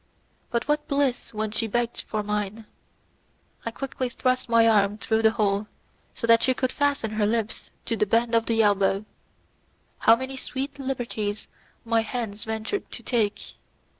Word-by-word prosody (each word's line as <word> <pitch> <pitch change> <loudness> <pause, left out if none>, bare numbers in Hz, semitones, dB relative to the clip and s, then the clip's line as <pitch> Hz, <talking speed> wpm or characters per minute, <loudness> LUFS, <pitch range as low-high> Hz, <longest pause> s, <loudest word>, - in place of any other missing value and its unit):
But 235 -1 -1
what 295 0 +1
bliss 280 -4 0
when 215 -1 -2
she 225 +1 0
begged 240 +2 -1
for 215 -1 -3
mine! 210 +1 -3 1.0
I - - +2
quickly 255 +1 -3
thrust 255 0 0
my 230 -1 +5
arm 205 -2 +3
through 220 +1 0
the 220 - +6
hole, 205 -1 +1 0.5
so - - -3
that 230 0 +6
she 260 - +3
could 255 0 0
fasten 285 -6 0
her 215 -1 +1
lips 225 0 -1 0.2
to 230 - 0
the 210 - +1
bend 230 +3 +2
of 230 0 +3
the 225 -1 +3
elbow. 200 0 +2 0.9
How 225 - +7
many 260 +2 -5
sweet 270 +2 -4
liberties 235 -6 -3 0.4
my 230 0 +3
hand 225 -2 -4
ventured 220 - -3
to - - -8
take! 220 -4 -1
225 Hz, 165 wpm, -26 LUFS, 215-250 Hz, 1.0 s, How